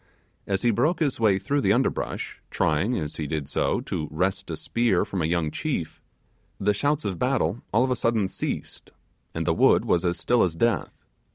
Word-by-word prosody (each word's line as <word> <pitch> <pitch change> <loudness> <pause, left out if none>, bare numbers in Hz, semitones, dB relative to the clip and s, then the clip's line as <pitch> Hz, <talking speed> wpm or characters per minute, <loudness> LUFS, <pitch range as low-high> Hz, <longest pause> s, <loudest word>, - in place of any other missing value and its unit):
As 95 -1 -1
he 120 - +4
broke 140 - +1
his 145 -7 0
way 105 -4 +4
through 145 +7 0
the 100 -4 +3
underbush, 130 +4 -1
trying, 90 +11 +1
as 75 -1 -4
he 75 - -3
did 75 -1 -3
so, - - 0
to 75 - -3
wrest 95 +5 -1
a 80 - -3
spear 115 -6 +1
from 95 - -3
a 80 - +1
young 85 -2 0
chief, 130 - -3 0.6
the 105 +1 +2
shouts 145 +7 0
of 95 -4 -3
battle 125 -6 0
all 115 +3 +4
of 130 - 0
a - - +2
sudden 115 -4 +1
ceased, - - -5 0.5
and - - -2
the - - +2
wood - - +4
was 85 - +2
as 85 0 0
still 120 -1 +2
as 85 -3 +1
death. 115 +2 -1
100 Hz, 200 wpm, -25 LUFS, 85-120 Hz, 0.6 s, he